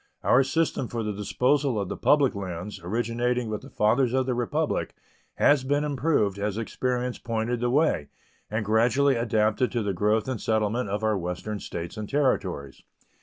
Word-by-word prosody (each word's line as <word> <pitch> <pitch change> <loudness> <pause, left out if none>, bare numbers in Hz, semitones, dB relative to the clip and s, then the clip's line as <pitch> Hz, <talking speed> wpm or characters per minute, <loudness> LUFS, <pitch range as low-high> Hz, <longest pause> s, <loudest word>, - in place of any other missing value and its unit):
Our 135 - +5
system 135 -2 0
for 115 -1 -3
the 105 -1 -2
disposal 125 +5 +1
of 100 - -2
the - - -4
public 145 -4 +3
lands, 95 0 -6
originating 120 +4 -1
with 105 - -3
the - - -12
fathers 120 +4 +2
of 130 0 +2
the 130 - 0
Republic, 120 -1 -1 0.4
has 145 -3 +4
been 145 +2 +1
improved 135 -9 0
as 105 0 -2
experience 125 +2 -2
pointed 115 +1 -2
the 120 +1 0
way, 130 - +2 0.4
and 110 0 -2
gradually 125 +6 +3
adapted 110 +1 +1
to 120 -3 0
the 100 -1 -1
growth 105 +5 +1
and 130 -4 -3
settlement 110 +1 0
of 105 +2 -2
our 110 -2 +1
Western 90 +4 -4
States 85 0 -6
and 105 -1 -5
Territories. 130 - -1
115 Hz, 170 wpm, -26 LUFS, 105-130 Hz, 0.4 s, Our